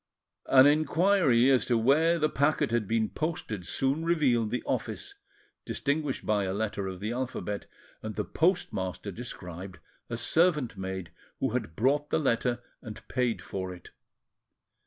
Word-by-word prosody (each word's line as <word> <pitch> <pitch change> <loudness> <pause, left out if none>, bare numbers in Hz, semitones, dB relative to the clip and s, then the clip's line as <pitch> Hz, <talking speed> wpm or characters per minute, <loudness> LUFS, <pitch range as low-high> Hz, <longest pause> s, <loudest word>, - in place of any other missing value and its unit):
An 130 0 +7
inquiry 155 -3 +4
as 125 -4 +4
to 120 - +3
where 155 +9 +4
the 155 -2 +2
packet 145 -4 +1
had 115 -3 0
been 110 0 +1
posted 110 - -4
soon 135 +4 0
revealed 135 -10 +2
the 125 +3 -2
office, 400 - -3 0.5
distinguished 145 -1 -2
by 105 -2 +1
a 95 0 -2
letter 105 -2 -2
of 95 -1 -6
the 105 +3 -3
alphabet, 120 -5 -4 0.3
and 110 -1 -5
the - - -2
postmaster 105 - -1
described 90 -4 -7 0.3
a 120 - -3
servant 150 - +2
maid 95 -2 -5 0.3
who - - 0
had 80 - -3
brought 145 +7 +1
the - - +2
letter 120 -4 0 0.2
and 110 -2 -10
paid 125 -3 0
for 95 -1 -4
it. 90 - -15
120 Hz, 150 wpm, -29 LUFS, 105-145 Hz, 0.5 s, An